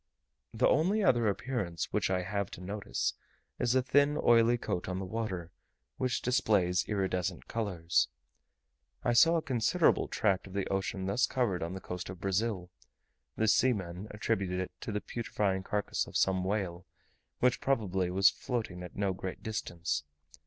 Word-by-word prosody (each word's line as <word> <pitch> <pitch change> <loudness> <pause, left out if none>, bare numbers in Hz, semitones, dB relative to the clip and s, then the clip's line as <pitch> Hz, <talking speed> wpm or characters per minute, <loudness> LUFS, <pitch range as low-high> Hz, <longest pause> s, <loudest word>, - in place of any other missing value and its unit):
The - - +2
only 190 +9 +3
other 120 - +4
appearance 100 - -2
which - - +1
I 90 -1 +1
have 100 +1 -2
to - - -11
notice, 95 - -2 0.5
is 120 +1 +2
a 130 - +4
thin 145 +3 +3
oily 120 0 +5
coat 90 -6 -3
on 90 - -2
the 95 - -3
water 95 -5 -4 0.5
which 130 -1 -1
displays 105 -8 +2
iridescent 95 -4 -1
colours. 90 -7 +1 1.0
I 120 - +2
saw 165 +8 +6
a 165 - +1
considerable 135 +7 +2
tract 100 -4 0
of 95 - -11
the 100 -1 -1
ocean 95 -1 -2
thus 105 +7 +2
covered 115 -9 0
on 85 +3 -3
the - - -5
coast 90 -1 -6
of 90 -1 -7
Brazil; 95 -1 -1 0.6
the 110 - +1
seamen 100 -5 +1
attributed 95 -3 -1
it 95 - -3
to - - -4
the 105 0 -2
putrefying 100 -5 -1
carcase 105 +2 -1
of - - -2
some 95 -1 +2
whale, 95 -3 -2 0.5
which 125 0 +2
probably 95 -9 +1
was 95 +2 +5
floating 110 -8 -4
at 90 - -9
no 100 -1 0
great 95 0 -6
distance. 85 -9 -2
100 Hz, 160 wpm, -31 LUFS, 90-115 Hz, 1.0 s, saw